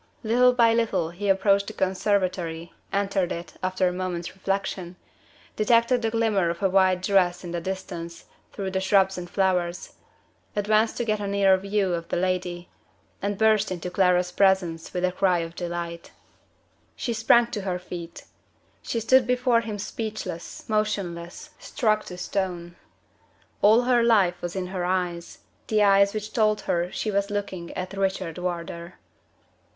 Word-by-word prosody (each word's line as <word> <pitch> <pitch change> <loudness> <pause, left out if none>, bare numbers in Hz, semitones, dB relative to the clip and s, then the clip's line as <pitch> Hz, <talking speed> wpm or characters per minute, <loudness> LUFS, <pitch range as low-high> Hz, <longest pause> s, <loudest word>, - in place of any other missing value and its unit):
Little 245 +3 +4
by 235 -2 +4
little 225 -8 0
he 200 +4 -3
approached 195 +1 +3
the - - -6
conservatory 185 -3 -1 0.2
entered 195 -2 0
it, 170 +1 -6
after 185 0 +1
a 180 - -1
moment's 180 -2 -4
reflection 190 -2 -3 0.6
detected 235 +3 +3
the 225 - 0
glimmer 220 -6 +1
of 170 +4 -4
a 195 - +4
white 185 -1 +3
dress 185 -2 +2
in 175 - -6
the 170 0 -3
distance, 175 -2 -6 0.3
through 195 -2 -4
the 190 0 -1
shrubs 190 -1 +3
and 175 0 -8
flowers 180 -2 -1 0.6
advanced 215 +2 +2
to 240 - -1
get 215 -1 0
a 205 - -3
nearer 195 -1 +4
view 195 -1 -1
of 170 -1 -3
the - - -1
lady 180 -1 -2 0.5
and 200 0 -2
burst 215 -1 +3
into 180 0 -4
Clara's 180 -1 +2
presence 180 -4 +1
with 180 0 0
a 180 - 0
cry 185 -1 +2
of 165 -1 -4
delight. 170 -1 -5 0.9
She 240 - -3
sprang 230 +1 +4
to 210 - -3
her 185 -2 -2
feet. 175 -2 -8 0.6
She 230 - -2
stood 255 +2 +4
before 250 -1 +2
him 220 -2 -5
speechless, 215 -4 -6
motionless, 205 - -3
struck 215 -4 0
to 180 - -8
stone. 175 -2 -3 0.9
All 220 +4 +6
her 245 -1 +3
life 200 -7 +3
was 175 +1 -5
in 190 -1 -2
her 180 -2 -2
eyes 175 -2 -2 0.3
the 215 -1 +3
eyes 200 0 +4
which 215 0 -5
told 215 -2 +2
her 175 +1 -1
she 215 - -2
was 200 0 0
looking 195 -4 -4
at 185 +1 -5
Richard 190 -3 -2
Wardour. 170 -1 -5
190 Hz, 160 wpm, -25 LUFS, 175-210 Hz, 0.9 s, All